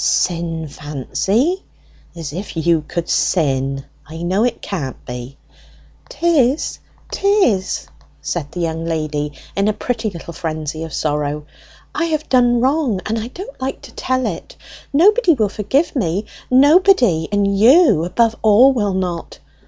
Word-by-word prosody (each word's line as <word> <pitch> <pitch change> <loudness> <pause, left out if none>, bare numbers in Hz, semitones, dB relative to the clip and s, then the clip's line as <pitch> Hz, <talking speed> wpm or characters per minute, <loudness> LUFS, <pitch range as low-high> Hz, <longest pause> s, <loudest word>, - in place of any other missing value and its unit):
"Sin, 165 -2 0
Fancy! 190 - -1 0.5
as 160 -4 -6
if 185 0 -6
you 160 -1 +2
could 170 -1 -3
sin! 135 -4 0 0.2
I 160 +2 -8
know 190 +5 +1
it 245 - 0
can't 150 -10 -4
be." 125 +2 -7 0.7
"'Tis, 320 - +1 0.3
'tis!" 245 - +1 0.3
said 145 - -4
the 180 - -5
young 165 -1 -2
lady, 155 -2 -2 0.2
in 200 +1 +1
a 215 - +2
pretty 225 0 -2
little 170 -2 -9
frenzy 155 -1 -4
of 160 - -9
sorrow. 150 0 -2 0.5
"I 335 - 0
have 310 -2 -2
done 245 -2 +3
wrong, 265 -6 +1
and 225 +1 -1
I 220 - -4
don't 285 0 -10
like 265 +1 -4
to - - -12
tell 255 -1 -1
it! 175 -6 -5 0.4
Nobody 370 - +4
will 215 -5 +1
forgive 265 - 0
me, 200 -3 -1 0.2
nobody! 260 - +4
and 200 -1 +1
you 240 - +6
above 225 +6 +1
all 225 +6 +6
will 205 -6 0
not! 180 -3 -3
200 Hz, 145 wpm, -18 LUFS, 160-255 Hz, 0.7 s, you